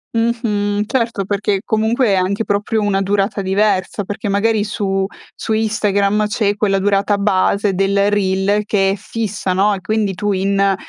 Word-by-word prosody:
Mh-mh. 210 -3 0
Certo 230 -5 -1
perché, 200 0 -1
comunque, 225 +3 +1
è - - +3
anche 190 +4 0
proprio 210 +2 -1
una 200 -1 +1
durata 200 +1 0
diversa, 195 0 0
perché 205 +1 -4
magari 210 +1 +1
su 195 -2 -1 0.3
su 220 - -3
Instagram 210 -1 +1
c'è 210 -1 0
quella 200 -2 +1
durata 200 +1 +1
base 200 0 +1
del 200 +2 +1
reel 200 +1 +1
che 195 -2 +1
è - - -1
fissa, 210 -2 -3
no, 200 +3 +2
e 190 - -5
quindi 215 -1 -1
tu 205 +2 -2
in 195 +1 +1
205 Hz, 160 wpm, -17 LUFS, 195-215 Hz, 0.3 s, è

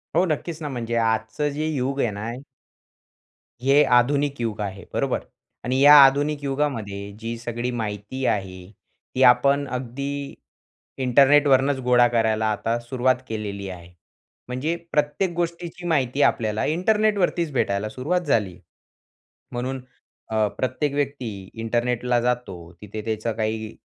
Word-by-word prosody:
हो, 175 +3 +4
नक्कीच 160 0 -3
ना, 150 - -3
म्हणजे 120 -3 -3
आजचं 115 +5 0
जे 155 +1 -2
युग 140 -2 -2
आहे 120 - +2
ना 110 +2 -4 1.3
हे 140 +2 +5
आधुनिक 140 +3 +1
युग 115 -3 -2
आहे, 100 -1 -5
बरोबर? - - 0 0.5
आणि 130 +2 0
या 145 +1 +9
आधुनिक 145 +2 +1
युगामध्ये 115 -9 -2
जी 115 +1 -4
सगळी 120 +1 -4
माहिती 110 +2 -4
आहे. 95 -3 -2 0.4
ती 130 - 0
आपण 140 +3 +4
अगदी 140 +3 -4 0.6
इंटरनेटवरनचं 135 +1 +4
गोळा 125 -1 +5
करायला 110 -2 +1
आता 115 +2 -1
सुरुवात 130 +1 +1
केलेली 100 -3 -5
आहे. 90 -1 -10 0.5
म्हणजे 130 +7 -2 0.2
प्रत्येक 150 +5 0
गोष्टीची 170 +1 -4
माहिती 140 -4 +1
आपल्याला 110 -5 +1
इंटरनेटवरतीच 185 -1 +1
भेटायला 100 -4 0
सुरुवात 145 +11 -1
झाली. 100 -9 +1 1.0
म्हणून 130 +2 -3 0.5
अ, 110 -1 +2
प्रत्येक 130 +3 -1
व्यक्ती 130 -9 -3
इंटरनेटला 120 +1 0
जातो. 125 -5 -1 0.3
तिथे 105 +1 -6
त्याचं 110 +1 -2
काही 110 0 -3
125 Hz, 125 wpm, -23 LUFS, 110-145 Hz, 1.3 s, या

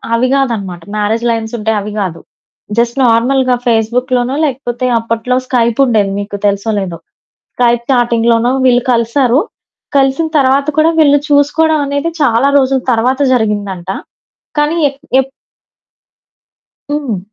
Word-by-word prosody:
అవి 250 +2 +1
కాదనమాట. 215 -10 -1
Marriage 215 +3 -1
lines 225 0 -2
అయితే 220 +1 -1
అవి 210 +1 -6
కాదు. 170 -4 -4 0.6
జస్ట్ 235 +2 0
నార్మల్‌గా 250 +2 +2
ఫేస్‌బుక్‌లోనో 245 +3 0
లేకపోతే 255 -2 -3
అప్పట్లో 230 +2 -2
స్కైప్ 235 -1 0
ఉండేది, 215 -5 +1
మీకు 205 0 -5
తెలుసో 200 +2 -1
లేదో. 180 -3 -5 0.6
స్కైప్ 240 -1 +2
చాటింగ్‌లోనో 235 0 +2
వీళ్ళు 245 -1 +4
కలిసారు. 240 +3 +2 0.6
కలిసిన 275 +4 +2
తర్వాత 275 +1 +2
కూడా 320 +1 +4
వీళ్ళు 290 -2 +5
చూసుకోవడం 295 +2 +2
అనేది 285 +4 -2
చాలా 250 0 +3
రోజుల 265 -1 +1
తర్వాత 250 +4 0
జరిగిందంట. 205 -5 -2 0.7
కానీ 295 +3 +1
ఎక్ 275 0 -13 0.2
ఎప్ 265 - -5 1.6
హ్మ్. 285 -9 -2
240 Hz, 120 wpm, -13 LUFS, 225-270 Hz, 1.6 s, వీళ్ళు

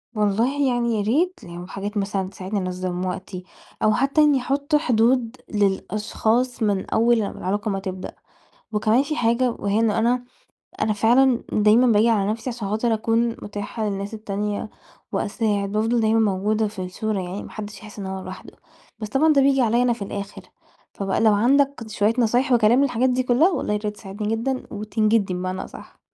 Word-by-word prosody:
والله 230 +7 +1
يعني 235 -1 0
يا - - 0
ريت 325 - +1
لو 175 0 -9
حاجات 205 +2 -5
مثلًا 195 -1 -2
تساعدني 195 +1 -4
أنظّم 185 0 -3
وقتي 185 0 -5 0.4
أو 215 0 +4
حتّى 275 +6 +2
إنّي 290 -3 +4
أحُط 280 +4 -1
حدود 245 -3 +2 0.2
للأشخاص 215 +4 0
من 200 -3 0
أول 235 +1 +3
ما 200 - -2
العلاقة 205 +4 -2
ما 195 - -2
تبدأ. 185 -1 -6 0.6
وكمان 215 +4 +3
في 305 +2 -3
حاجة 240 +2 +2
وهي 205 -1 -1
إنه 225 -1 +2
أنا 245 +2 +1 0.6
أنا 215 - +2
فعلًا 240 +4 +3
دايمًا 215 +4 +4
باجي 220 +1 +4
على 205 -3 +2
نفسي 230 +3 -4
عشان 230 -4 -5
خاطر 225 +2 +1
أكون 230 +2 +1
مُتاحة 205 +2 -5
للناس 200 +1 -4
التانية 210 -1 -3 0.4
وأساعد، 200 -2 -1
بافضل 225 +3 +1
دايمًا 220 +1 +3
موجودة 210 +1 +1
في 205 -2 -7
الصورة 210 +3 -3
يعني 185 +3 -5
ما - - -10
حدّش 210 -1 -7
يحِس 210 -1 -11
إن 195 - -5
هو 190 0 -5
لوحده، 185 0 -10 0.5
بس 215 - -5
طبعًا 305 +6 +3
ده 275 - +4
بييجي 270 -1 +3
عليّا 235 +1 +3
أنا 245 -1 +2
في 230 - -11
الآخِر، 200 0 -6 0.5
فبقى 195 0 -1
لو 220 -1 +5
عندك 270 +4 +2
شوية 215 +1 +1
نصايح 245 +3 +2
وكلام 240 +2 +4
للحاجات 255 -1 +1
دي 255 0 +1
كُلّها، 255 +9 +4
والله 265 - -2
ياريت 210 0 -3
تساعدني 210 +2 -3
جدًا 260 +3 -2
وتنجدني 215 -2 0
بمعنى 185 +1 -3
أصح؟ - - -13
215 Hz, 175 wpm, -23 LUFS, 200-240 Hz, 0.6 s, لو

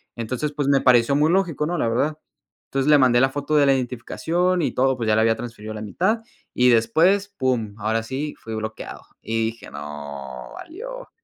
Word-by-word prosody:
Entonces, 125 +6 -3
pues, 145 -2 -2
me 140 - +4
pareció 125 +1 +4
muy 155 +3 +3
lógico, 175 -6 +1
¿no? 175 +1 -2
La 115 - +1
verdad. 140 +7 0 0.5
Entonces, 135 +1 0
le 150 - +7
mandé 125 -2 +4
la 135 - +4
foto 145 +2 -2
de 145 - +5
la 135 - +5
identificación 165 +8 -1
y - - 0
todo, 130 +1 +2
pues, 115 -2 -3
ya 110 - +3
la 110 - +3
había 115 0 +3
transferido 110 -3 -7
la 105 - -6
mitad 190 - 0 0.3
y 125 0 +4
después, 165 - +3
pum, 120 -6 -1
ahora 110 +2 0
sí 140 +6 -4
fui 115 - -8
bloqueado. 110 0 -6 0.2
Y 115 0 -1
dije: 115 +1 -8
"¡No!, 70 -4 -8
valió". - - -9
130 Hz, 200 wpm, -23 LUFS, 110-150 Hz, 0.5 s, le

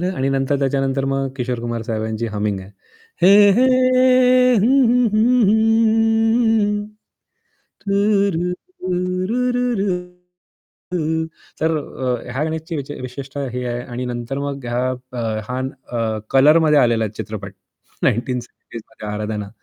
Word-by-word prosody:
आणि 135 +1 0
नंतर 135 +1 0
त्याच्यानंतर 135 0 0
मग 135 0 -1
किशोर 125 -1 -2
कुमार 120 -1 -4
साहेबांची 110 0 -3
हमिंग 105 -2 -2
आहे. 95 +2 -12 0.5
हे 200 +2 +7
हे 250 +6 +4 0.9
हं, 200 - +2
हं, 245 -1 +4
हं, 235 +3 +3
हं. 225 -1 +2 1.0
तूरु, 200 -3 +1 0.4
रु, 180 0 -1
रु, 250 +3 0
रु, 245 0 +1 1.3
रु. 160 -1 -1 0.3
तर 160 0 +1
अ, 130 -4 -3
ह्या 135 +4 -2
गाण्याची 160 +1 -4
विच 140 0 -6
विशिष्टता 135 +2 -7
ही 125 0 -4
आहे 120 0 -3
आणि 125 0 -5
नंतर 120 +2 -4
मग 140 -3 -5
हा 125 +2 -1 0.2
अ, 125 - -6 0.3
हा 125 +1 -3 0.3
अ, 115 -2 -2
कलरमध्ये 150 +3 +5
आलेला 115 -4 +2
चित्रपट 100 -2 -7 0.5
1970sमध्ये 120 -2 -4
"आराधना" 105 -1 -4
140 Hz, 120 wpm, -20 LUFS, 120-200 Hz, 1.3 s, हे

